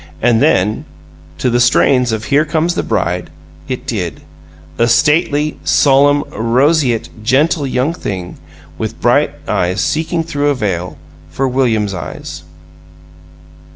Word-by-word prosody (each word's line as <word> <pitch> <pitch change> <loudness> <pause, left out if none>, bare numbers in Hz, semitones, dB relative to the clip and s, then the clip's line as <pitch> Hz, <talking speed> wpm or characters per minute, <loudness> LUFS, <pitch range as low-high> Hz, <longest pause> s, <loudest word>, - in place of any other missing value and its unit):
And 115 0 +2
then, 110 -8 +2 0.5
to 125 - 0
the 120 - +2
strains 125 0 +3
of 110 -1 -2
"Here 145 +2 +3
Comes 160 +3 0
the - - -1
Bride," 90 +1 -2 0.4
it - - -5
did - - -4 0.6
a 115 - +3
stately, 155 +1 +2
solemn, 145 +1 +4
roseate, 125 +2 +1
gentle 140 +4 +2
young 130 +5 0
thing 95 - -6 0.4
with - - -4
bright - - +3 0.2
eyes 90 +2 0
seeking 165 +1 -1
through 145 -3 -1
a 145 - +1
veil 90 - -3 0.3
for 135 +11 -1
William's 115 -6 0
eyes. 80 -3 -7
130 Hz, 125 wpm, -15 LUFS, 110-150 Hz, 0.6 s, solemn